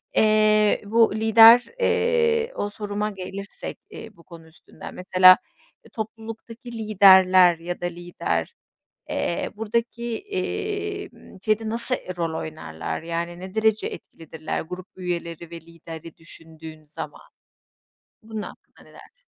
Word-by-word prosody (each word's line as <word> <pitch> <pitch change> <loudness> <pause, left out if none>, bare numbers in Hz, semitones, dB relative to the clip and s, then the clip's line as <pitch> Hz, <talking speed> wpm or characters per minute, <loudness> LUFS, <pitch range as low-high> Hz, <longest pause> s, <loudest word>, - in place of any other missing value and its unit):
eee, 215 -1 +4
bu 225 0 +3
lider, 225 +2 +7
eee, 465 0 +1
o 205 - -2
soruma 205 0 -3
gelirsek, 195 +1 -7
eee, 325 - -10
bu 170 - -18
konu 170 -2 -14
üstünden, 160 - -13
mesela, 185 0 +6 0.5
eee, - - -16
topluluktaki 225 +2 -8
liderler 190 -5 +6
ya 175 +1 -6
da - - -2
lider, 175 0 -3 0.6
eee, - - -2
buradaki, 235 +2 -2
emm, 405 - -5
şeyde 215 +1 +1
nasıl 235 +3 0
e 185 - -8
rol 165 -2 -2
oynarlar? 155 - -6
Yani, 170 +1 -4
ne 185 +2 -9
derece 220 -1 +2
etkilidirler? 160 -1 -7
Grup 180 +2 -8
üyeleri 170 -2 -5
ve 170 -1 -8
lideri 165 0 -11
düşündüğün 160 -1 -12
zaman? 150 - -9 0.9
Bunun 220 -1 -6
hakkında - - -13
ne - - -20
dersin? - - -17
205 Hz, 125 wpm, -24 LUFS, 170-225 Hz, 0.9 s, lider